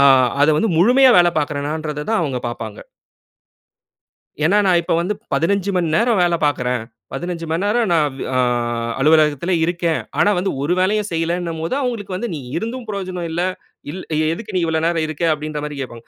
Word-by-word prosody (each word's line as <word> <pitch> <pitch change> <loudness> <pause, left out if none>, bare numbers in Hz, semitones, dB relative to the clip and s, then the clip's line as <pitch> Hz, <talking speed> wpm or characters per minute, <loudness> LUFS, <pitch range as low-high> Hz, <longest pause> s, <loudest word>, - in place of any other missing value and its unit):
ஆ - - +7 0.3
அத 145 - +5
வந்து 220 +9 +1
முழுமையா 250 +9 +6
வேல 175 -1 +6
பார்க்கிறனான்றத 150 +1 -2
தான் 225 - +2
அவுங்க 135 -5 -2
பாப்பாங்க. 110 -3 -5 1.7
ஏன்னா, 175 +7 +3
நான் 180 -2 +4
இப்ப - - -2
வந்து 185 +5 -1 0.2
15 200 +3 +1
மணி 175 -2 +1
நேரம் 230 -2 +2
வேல 175 -1 +2
பார்க்கிறேன். 125 -4 -1 0.3
15 170 +4 -4
மணிநேரம் 205 +7 +1
நான் 160 -3 +3
வே - - -4
ஆ - - +1 0.6
அலுவலகத்தில 155 +3 +3
இருக்கேன். 170 -1 0 0.2
ஆனா, 205 - +4
வந்து 190 +2 0
ஒரு 160 +5 0
வேலையும் 210 +3 +1
செய்யலேன்னும்போது, 165 +2 -2
அவுங்களுக்கு 230 -7 -3
வந்து 240 +5 -3
"நீ 150 - -5 0.2
இருந்தும் 230 +6 -4
பிரயோஜனம் 185 -4 -4
இல்ல. 170 +2 -1 0.5
இல் 185 +5 -6 0.3
எதுக்கு 215 +4 -7
நீ 180 - +2
இவ்வளோ 160 -1 0
நேரம் 165 -2 +1
இருக்க?" 155 +2 -6
அப்பிடின்றமாரி 150 -1 -4
கேப்பாங்க. 120 -3 -7
170 Hz, 165 wpm, -19 LUFS, 150-195 Hz, 1.7 s, ஆ